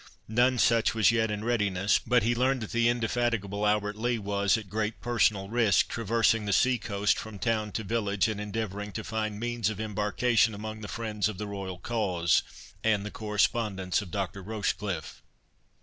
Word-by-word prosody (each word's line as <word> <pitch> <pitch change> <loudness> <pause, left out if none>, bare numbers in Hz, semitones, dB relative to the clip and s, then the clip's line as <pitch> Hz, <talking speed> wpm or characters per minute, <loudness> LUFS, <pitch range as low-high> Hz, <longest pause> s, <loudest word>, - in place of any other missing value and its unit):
None 125 +3 +3
such 115 -1 +3
was 110 0 +5
yet 110 -1 +1
in 105 0 -3
readiness; 105 -5 +1
but 125 -3 +2
he 120 +2 +2
learned 130 +2 +1
that 110 - -6
the 115 0 +3
indefatigable 115 -4 0
Albert 105 0 +1
Lee 120 +2 0
was, 100 0 +1
at 110 -3 -7
great 110 +2 -2
personal 110 -5 +1
risk, 110 -2 +3
traversing 115 -1 +1
the 100 - 0
sea 125 +4 +3
coast 100 -1 0
from 110 -2 -8
town 110 0 -1
to 110 - -2
village, 105 -3 0
and 105 -2 -3
endeavouring 105 -1 -4
to - - -4
find 110 -1 -3
means 120 -1 -1
of 110 -2 -5
embarkation 110 +1 +1
among 110 +1 -6
the 105 - -6
friends 110 -2 -2
of 105 - -6
the 105 - -4
royal 100 -3 -5
cause, 90 -5 +1 0.4
and 105 -2 +2
the 105 - -5
correspondents 105 -3 0
of 100 - -9
Dr. 95 0 -3
Rochecliffe. 100 -4 -3
110 Hz, 180 wpm, -28 LUFS, 100-115 Hz, 0.4 s, was